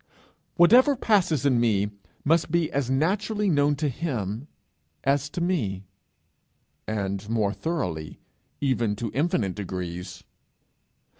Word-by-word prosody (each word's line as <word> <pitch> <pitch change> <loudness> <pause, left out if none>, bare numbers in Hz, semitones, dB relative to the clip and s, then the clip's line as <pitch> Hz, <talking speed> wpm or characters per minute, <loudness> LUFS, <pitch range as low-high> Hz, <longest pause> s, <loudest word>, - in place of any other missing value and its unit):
Whatever 250 - +6
passes 180 - +2
in 130 -4 +4
me 105 -3 +2 0.3
must 165 +2 +3
be 170 -1 +1
as 140 -3 -1
naturally 200 +8 +1
known 145 -1 +3
to 150 +1 -1
him 120 - -3 0.6
as 140 +1 +1
to 175 - -4
me, 110 - -1 1.0
and 100 -1 -3
more 110 -3 +1
thoroughly, 90 - -3 0.4
even 120 -6 +1
to 115 +1 -4
infinite 125 - 0
degrees. 90 -2 -6
135 Hz, 115 wpm, -26 LUFS, 105-165 Hz, 1.0 s, Whatever